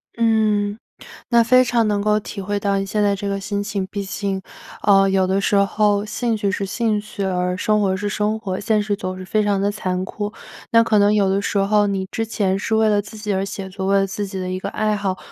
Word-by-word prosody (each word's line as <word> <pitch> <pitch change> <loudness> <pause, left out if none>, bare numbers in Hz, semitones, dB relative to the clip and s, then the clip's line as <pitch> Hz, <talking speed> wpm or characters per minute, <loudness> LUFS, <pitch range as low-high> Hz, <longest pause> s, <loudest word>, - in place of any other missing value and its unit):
嗯， 215 -2 +1 0.5
那 235 -1 +6
非 255 +2 +5
常 240 -2 +1
能 205 -1 0
够 210 0 +2
体 205 - -7
会 205 +1 -2
到 200 -1 +1
你 195 - -1
现 210 +2 -1
在 200 -1 +3
这 200 +1 -4
个 200 0 -2
心 200 0 -2
情。 200 -2 -3
毕 205 - -3
竟， 195 0 -3 0.4
呃， 195 -1 +5
有 190 -1 +2
的 190 +1 +1
时 200 - +1
候 205 +1 +2
兴 230 +2 -1
趣 205 -2 -1
是 195 +1 -2
兴 220 +1 0
趣， 205 -1 -7
而 180 -1 -1
生 210 +2 +1
活 190 -2 +1
是 205 +2 -3
生 210 +1 0
活， 190 -4 -4
现 215 0 +1
实 205 0 -1
总 185 -3 -5
是 185 - -8
非 215 +3 +1
常 205 -1 +1
的 200 +1 +1
残 185 -3 -2
酷。 205 +2 -5 0.4
那 230 0 +6
可 220 -2 +3
能 205 +1 +4
有 200 -2 +3
的 195 +1 +1
时 200 - -3
候 205 +1 +3
你 195 -1 -2
之 225 - -2
前 195 -3 0
是 220 - -1
为 220 0 +3
了 205 -1 +3
自 205 +2 -11
己 210 -1 -3
而 190 0 0
写 195 -1 -6
作， 190 0 -4
为 200 +1 +3
了 195 - +2
自 205 +1 -4
己 195 -1 -6
的 185 -1 -3
一 185 - -2
个 - - -4
爱 215 0 0
好， 195 -2 -2
205 Hz, 275 characters per minute, -21 LUFS, 195-215 Hz, 0.5 s, 那